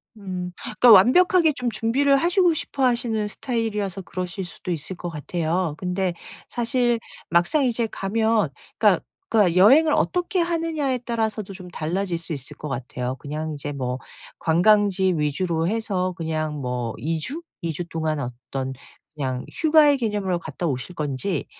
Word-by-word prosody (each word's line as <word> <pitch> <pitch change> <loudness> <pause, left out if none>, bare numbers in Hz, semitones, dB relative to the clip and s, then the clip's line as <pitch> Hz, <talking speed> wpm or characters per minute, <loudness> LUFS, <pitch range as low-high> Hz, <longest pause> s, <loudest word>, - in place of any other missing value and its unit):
음 185 -4 -5
그러니까 245 - +5
완벽하게 320 - +6
좀 250 -3 -2
준비를 245 +6 +2
하시고 350 +2 +3
싶어 285 -3 -3
하시는 235 -3 +1
스타일이라서 210 -5 -2
그러실 180 0 -5
수도 175 +2 -7
있을 170 +3 -4
것 175 0 -5
같아요. 165 +1 -2
근데 180 0 -1 0.3
사실 240 0 +1 0.3
막상 175 - +3
이제 235 -2 +1
가면 220 +2 +1 0.3
그러니까 - - +4 0.3
그러니까 190 -6 +3
여행을 275 +12 +7
어떻게 360 +2 +1
하느냐에 325 -6 0
따라서도 220 -4 -2
좀 185 -1 -10
달라질 175 +2 -2
수 165 +1 -9
있을 135 -3 -6
것 150 - -6
같아요. 125 0 -4
그냥 155 +2 -4
이제 145 0 -5
뭐 130 -2 -3 0.4
관광지 190 +2 +3
위주로 160 +3 0
해서 195 -3 -1
그냥 155 -2 -2
뭐 125 -3 -2
2 160 +2 -2
주? 285 - -4 0.2
2 165 -2 -2
주 175 - -4
동안 155 -2 -1
어떤 130 +1 -5 0.4
그냥 130 -3 -2
휴가의 305 -3 +5
개념으로 205 -6 -1
갔다 170 +1 -4
오실 135 +4 -3
건지 150 +5 -2
185 Hz, 330 characters per minute, -23 LUFS, 160-235 Hz, 0.4 s, 여행을